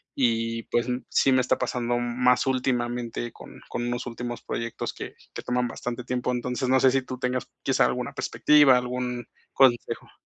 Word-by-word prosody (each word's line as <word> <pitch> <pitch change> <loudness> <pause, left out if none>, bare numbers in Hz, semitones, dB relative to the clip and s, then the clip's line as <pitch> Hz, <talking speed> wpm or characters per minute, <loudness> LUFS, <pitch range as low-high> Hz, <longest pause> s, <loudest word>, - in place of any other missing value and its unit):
y, 115 -2 0
pues, 120 - +1 0.2
sí 135 - +3
me 130 - +4
está 125 - +1
pasando 120 -1 -1
más 125 +1 +2
últimamente 120 -2 -1
con - - -13
con 120 0 -3
unos 120 +1 -2
últimos 120 0 -5
proyectos 115 0 -4
que - - -8 0.2
que - - -5
toman 125 0 0
bastante 120 +1 -5
tiempo. 125 0 -1
Entonces, 125 +1 -2
no 130 0 +5
sé 130 0 +5
si 135 0 +2
tú 130 0 -6
tengas, 125 0 -2
quizá, - - +3
alguna - - -2
perspectiva, 145 -4 +5
algún 125 -1 -3 0.3
consejo. 125 -3 +2
125 Hz, 170 wpm, -26 LUFS, 120-125 Hz, 0.3 s, no